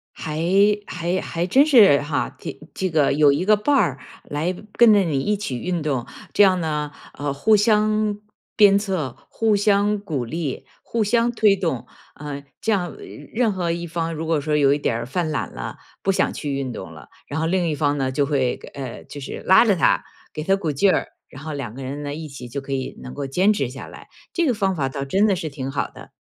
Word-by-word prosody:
还 155 -1 -5 0.5
还 180 +1 -2
还 170 +1 -3
真 270 +9 +5
是 215 - +6
哈， 145 0 -2
这 - - -7 0.2
这 190 - -2
个 155 -5 +2
有 145 0 +5
一 145 +6 0
个 215 +1 +6
伴 285 +8 +1
儿 175 - +2 0.3
来 155 +5 -2 0.2
跟 235 -2 +6
着 205 - +5
你 160 -8 0
一 210 +10 0
起 195 -11 -4
运 175 +1 -2
动， 135 -6 -1 0.3
这 205 - +6
样 185 -2 +4
呢， 150 -2 -2 0.3
呃， 145 -1 -2
互 210 +10 +4
相 215 0 +2 0.4
鞭 200 -2 +6
策、 185 - -3
互 220 -2 +1
相 205 0 +2
鼓 155 -10 -3
励、 150 +2 -4 0.2
互 230 -1 -1
相 235 +3 +2
推 215 -4 +4
动， 165 -10 -2 0.3
呃， 145 -1 -7 0.2
这 220 - 0
样 180 -4 -1 0.4
任 230 -1 +2
何 180 -3 -1
一 170 +1 -3
方 165 0 -2
如 160 0 -4
果 160 -2 +2
说 150 +1 -1
有 140 -2 +4
一 - - +1
点 120 -5 -1
儿 115 - -4
犯 160 +4 -1
懒 - - -2
了， - - -6 0.3
不 195 - +3
想 190 - +1
去 145 -2 -4
运 135 -2 -2
动 95 -7 -8
了， 75 -4 -13 0.2
然 145 - -3
后 160 - +1
另 180 0 +1
一 - - 0
方 145 -1 +1
呢， 135 -1 0
就 140 +1 +1
会， 135 -4 +1 0.2
呃， 130 -4 -6
就 145 - -9
是 140 - -6
拉 190 +5 +7
着 205 -4 +3
他 170 - +3 0.3
给 155 - -5
他 195 +4 +3
鼓 175 -6 -2
劲 185 +8 +3
儿， - - 0 0.2
然 135 - -12
后 155 -1 -5
两 135 -6 -5
个 135 +2 -8
人 140 +3 -5
呢， 145 0 -4
一 155 +1 -6
起 135 -4 -9
就 135 +4 -5
可 135 - -9
以 135 -1 -3
能 125 - -8
够 145 - -3
坚 180 +10 +3
持 140 -11 0
下 135 +2 -9
来， - - -13 0.2
这 345 - +1
个 260 - +2
方 195 -3 0
法 140 -5 0
倒 140 +1 -4
真 190 +10 +2
的 205 -3 +3
是 170 -3 -4
挺 135 -2 -5
好 140 - -1
的。 - - -14
160 Hz, 245 characters per minute, -22 LUFS, 140-200 Hz, 0.5 s, 拉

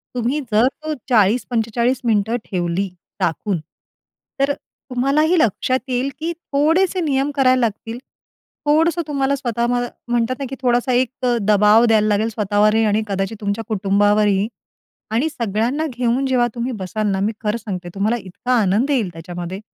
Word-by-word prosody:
तुम्ही 250 +5 0
जर 220 +4 +4
तो 310 +3 -4 0.2
40-45 235 +2 +1
मिनिटं 220 +1 +1
ठेवली 180 +1 -1 0.3
राखून, 175 +2 0 0.8
तर 275 +1 +2
अ, - - -2 0.3
तुम्हालाही 280 +7 +2
लक्षात 255 +2 +1
येईल, 255 +2 0
की 330 +2 -2
थोडेसे 330 +4 +1
नियम 275 0 +1
करायला 255 -2 +4
लागतील. 225 0 -2 0.7
थोडंसं 325 +3 +3
तुम्हाला 280 -1 0
स्वतः 235 -3 -2
म्ह 245 0 0 0.3
म्हणतात 240 +1 +1
ना, 275 - -3
की 270 - -5
थोडासा 245 0 +1
एक 255 - +1 0.2
अ, 245 -1 +3
दबाव 210 +3 +6
द्यायला 215 -2 +3
लागेल 210 +2 +1
स्वतःवरही 215 0 +2
आणि 210 +2 +2
कदाचित 195 +2 -2
तुमच्या 205 +2 -2
कुटुंबावरही 205 0 +2 0.6
आणि 250 +8 +1
सगळ्यांना 240 +5 -1
घेऊन, 250 +1 0
जेव्हा 250 -2 +2
तुम्ही 240 +2 -2
बसाल 210 +3 -2
ना, 190 - -1
मी 210 +3 +1
खरं 210 +2 0
सांगते 190 -5 -6
तुम्हाला 215 +4 +1
इतका 195 +7 -3
आनंद 205 +8 +1
येईल 230 -10 +1
त्याच्यामध्ये. 175 +3 -6
235 Hz, 150 wpm, -20 LUFS, 205-260 Hz, 0.8 s, दबाव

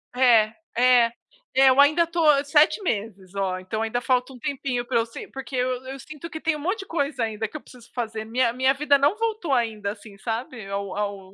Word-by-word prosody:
É. 230 -4 +5 0.2
É. 245 -1 +5 0.4
É, 265 0 +7
eu 260 +1 +3
ainda 305 +4 +6
estou 335 0 -1 0.2
7 305 +5 +4
meses, 200 - -4
ó, 190 -2 -1
então 200 +4 -3
ainda 225 +2 -1
falta 255 0 0
um 250 - -13
tempinho 250 -1 -2
pra 240 -1 0
eu 230 - +2
se 230 - -9
porque 270 0 -8
eu 255 0 -1
eu 265 +1 -7
sinto 300 +5 -9
que 315 - -7
tem 325 -1 +1
um - - -6
monte 375 +9 -2
de 390 - -7
coisa 285 -6 -1
ainda, 220 0 -2
que 215 - -20
eu 305 - -5
preciso 245 -2 -17
fazer, 220 -3 -4
minha 235 +1 +1
minha 260 +2 +3
vida 285 0 +3
não 285 +7 +3
voltou 435 -9 -1
ainda, 220 -5 0
assim, 205 -1 -12
sabe, 230 +1 -5
ao 200 -1 -4
ao 200 -2 -4
250 Hz, 220 wpm, -24 LUFS, 220-280 Hz, 0.4 s, É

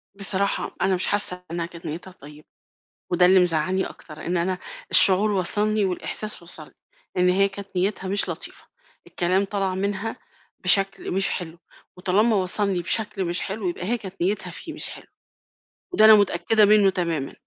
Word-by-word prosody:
بصراحة 200 0 -1
أنا 190 0 +2
مش 180 - +1
حاسّة 180 -3 +1
إنها 170 0 -3
كانت 170 0 -12
نيّتها 165 +4 -7
طيّبة. 150 -3 -15 0.6
وده 180 0 +4
اللي 185 +1 +5
مزعّلني 180 +2 +1
أكتر، 155 -1 -11
إن 175 +2 -1
أنا 180 +2 -1 0.3
الشعور 195 +3 +7
وصَلني 210 +3 +2
والإحساس 195 +2 -2
وصَلني 170 - -7 0.4
إن 180 0 +3
هي 195 +2 +3
كانت 200 -1 -10
نيّتها 190 +1 -1
مش 200 +1 0
لطيفة. - - -5 0.4
الكلام 185 +3 0
طلَع 195 -1 -2
منها 200 +4 -3 0.5
بشكل 195 0 +2
مش 195 +2 0
حلو، 170 -1 -6 0.4
وطالما 200 +5 +1
وصَلني 190 0 +1
بشكل 205 +1 -2
مش 175 0 -1
حلو 195 -1 -4
يبقى 175 0 -5
هي 235 +6 0
كانت 195 -3 -10
نيّتها 195 +5 -1
فيه - - -7
مش - - -4
حلو، - - -12 0.9
وده 215 - +5
أنا 220 - +9
متأكدة 205 +2 +2
منُّه 205 -1 +5
تمامًا. 170 -7 -3
190 Hz, 160 wpm, -23 LUFS, 180-200 Hz, 0.9 s, أنا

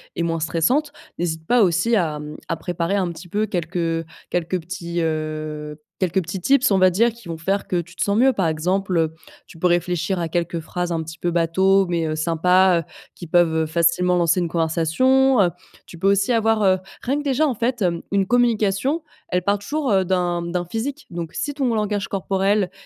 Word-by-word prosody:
et 170 - -1
moins 165 -1 -1
stressante, 170 - +1 0.3
n'hésite 160 -2 -2
pas 245 +6 +3
aussi 205 +5 +3
à, 165 -7 0
mmh, 150 0 -8
à 165 - -1
préparer 170 +3 -2
un 185 -3 0
petit 170 +2 -11
peu 210 +5 0
quelques, 180 -3 -3
heu, 165 -1 -1 0.3
quelques 175 +1 -1
petits, 170 0 -4
heu, 155 -1 -3 0.2
quelques 185 0 +1
petits 175 +3 -5
tips, 265 +5 +3
on 195 - +4
va 185 0 +6
dire, 230 +6 +3
qui 230 -4 -15
vont 165 -1 -5
faire 195 +5 -1
que, 175 -2 0
tu 175 +2 -15
te - - -5
sens 200 0 +1
mieux. 265 +3 +5
Par 190 -7 0
exemple, 180 +4 0
heu, 160 -1 +1 0.3
tu 165 - -14
peux 180 - +3
réfléchir 175 +1 0
à 170 -2 -2
quelques 170 0 -1
phrases 175 +2 -4
un 165 -1 -1
petit 160 +1 -9
peu 175 - -1
bateau, 190 +3 +3
mais, 170 -2 -1
heu, 155 - -2
sympa, 175 +3 +3
heu, - - -25 0.2
qui 175 - -9
peuvent, 170 0 +3
heu, 160 0 +1
facilement 170 +2 +2
lancer 170 +1 +2
une 175 - 0
conversation. 175 +12 +2
Heu, 180 - +4 0.4
tu 170 - -12
peux 195 - +3
aussi 200 +4 +2
avoir, 225 -1 +2
heu 190 -1 +4 0.3
rien 270 +4 0
que - - -5
déjà, 280 +2 +2
en 270 - 0
fait, 235 +1 -2
hem 170 -2 0
une 195 -1 +2
communication, 240 - +1 0.2
elle 180 -1 -1
part 200 +1 +1
toujours, 280 +5 -2
heu, 190 -2 +3
d'un 175 -1 0
d'un 175 +1 -3
physique, 250 - -4
donc 170 -1 -6
si 290 - -3
ton 270 -4 0
langage 210 -2 -1
corporel 195 0 0
180 Hz, 215 wpm, -22 LUFS, 165-205 Hz, 0.4 s, va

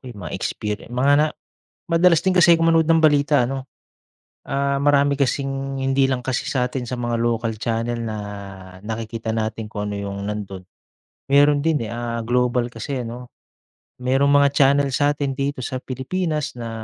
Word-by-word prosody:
eh, 120 - -10
mga 85 -6 -7
experien 105 +1 -4
mga 125 +4 +2
na 155 - +4 0.7
madalas 170 0 +4
din 190 - +2
kasi 175 -2 +6
ako 165 - 0
manood 160 -1 +3
ng 165 -1 +4
balita, 145 -3 +4
ano? 135 +2 -4 0.8
Ah, 140 0 -1
marami 145 0 +3
kasing 135 0 -2
hindi 135 0 +2
lang 130 - 0
kasi 130 0 -2
satin 125 0 -1
sa 125 +1 -5
mga 120 -1 -2
local 115 -1 0
channel 115 +2 -2
na 110 -1 -4 0.7
nakikita 110 +1 -5
natin 110 -1 -3
kung 105 -1 -4
ano - - -4
yung 100 0 -5
nandun. 100 -3 -6 0.6
Meron 145 +1 +5
din, 155 -7 0
eh, - - -7
ah, 120 0 -3
global 125 0 +1
kasi 120 +3 -5
ano. 120 +1 -8 0.7
Merong 135 +3 +2
mga 145 0 +5
channel 140 0 +4
sa'tin 140 0 0
dito 140 -1 -2
sa 130 +1 -3
Pilipinas 150 +3 -3
na, 115 -1 -5
130 Hz, 165 wpm, -22 LUFS, 115-140 Hz, 0.8 s, kasi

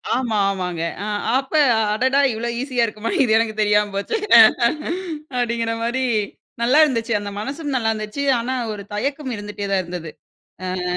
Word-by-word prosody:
ஆமா, 240 -4 -1
ஆமாங்க. 180 -4 -3 0.2
அ - - -4 0.3
அப்ப 270 +2 -9 0.4
அடடா, 260 +5 +2
இவ்ளோ 230 +2 -3
ஈஸியா 255 -3 0
இருக்குமா! 220 0 -4
இது 240 - 0
எனக்கு 225 -1 0
தெரியாம 210 0 +2
போச்சே! 200 - -1 1.2
அப்படிங்கிற 235 -1 0
மாதிரி, 245 +3 -1 0.6
நல்லா 250 +5 +3
இருந்துச்சு. 235 -6 0
அந்த 205 0 -6
மனசும் 280 +6 -4
நல்லா 225 -3 +1
இருந்துச்சு, 215 +4 -5 0.2
ஆனா 240 +2 -2 0.2
ஒரு 205 -1 -7
தயக்கம் 275 +5 -3
இருந்துட்டே 205 0 -6
தான் 195 -1 +2
இருந்தது. 175 -2 -6 0.9
அ - - 0
230 Hz, 150 wpm, -21 LUFS, 210-260 Hz, 1.2 s, நல்லா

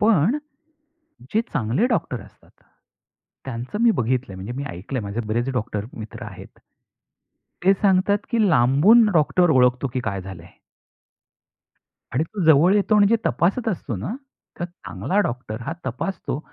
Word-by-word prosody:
पण, 215 - +3 1.0
जे 220 - +4
चांगले 135 - +1
डॉक्टर 165 - -1
असतात, 100 - -20 0.9
त्यांचं 130 - -5
मी 235 - +6
बघितलंय, 125 - -1
म्हणजे 95 +6 -6
मी 140 +3 -4
ऐकलंय, 95 +10 -5
माझे 100 +3 -3
बरेच 120 +4 -1
डॉक्टर 105 -3 -3
मित्र 110 -1 -8
आहेत. - - -11 1.1
ते 195 - +6
सांगतात 195 +1 +2
की 235 - +1
लांबून 155 - +5
डॉक्टर 170 +2 +3
ओळखतो 125 -1 +3
की 130 - 0
काय 100 -3 -2
झालंय? 90 -3 -10 1.7
आणि 145 +6 +1
तो 195 +3 -5
जवळ 160 +5 +6
येतो 210 +1 +3
आणि 205 +2 +5
तपासत 190 - +1
असतो 150 - -3
ना, 140 - -4 0.4
तर 175 - -2
चांगला 180 +2 -4
डॉक्टर 120 -2 -6
हा 165 - -4
तपासतो. 140 +4 -3
140 Hz, 140 wpm, -22 LUFS, 115-195 Hz, 1.7 s, मी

